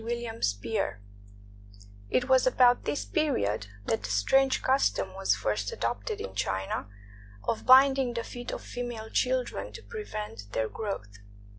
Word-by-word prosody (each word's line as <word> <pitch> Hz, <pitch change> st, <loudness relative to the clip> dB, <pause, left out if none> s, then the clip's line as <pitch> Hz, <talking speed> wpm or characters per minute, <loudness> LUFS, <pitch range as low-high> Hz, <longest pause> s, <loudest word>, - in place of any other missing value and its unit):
WILLIAM 235 Hz, -1 st, -4 dB
SPEER 100 Hz, -, -1 dB, 1.1 s
It 245 Hz, -, +1 dB
was 260 Hz, -1 st, +5 dB
about 250 Hz, -1 st, +4 dB
this 290 Hz, -, -1 dB
period 105 Hz, -, 0 dB, 0.2 s
that 110 Hz, -, 0 dB
the 100 Hz, -, -5 dB
strange 260 Hz, -, +3 dB
custom 100 Hz, -, +1 dB
was 95 Hz, +1 st, +1 dB
first 100 Hz, 0 st, -1 dB
adopted 105 Hz, -3 st, -3 dB
in 95 Hz, -1 st, -6 dB
China 95 Hz, 0 st, -2 dB, 0.6 s
of 225 Hz, -, -2 dB
binding 265 Hz, -1 st, +6 dB
the 235 Hz, -, -1 dB
feet 245 Hz, +1 st, -7 dB
of -, -, -6 dB
female 240 Hz, -3 st, -6 dB
children 255 Hz, -1 st, 0 dB
to -, -, -9 dB
prevent 210 Hz, -, -7 dB
their 110 Hz, 0 st, 0 dB
growth. 105 Hz, -, -5 dB
220 Hz, 140 wpm, -29 LUFS, -, 1.1 s, binding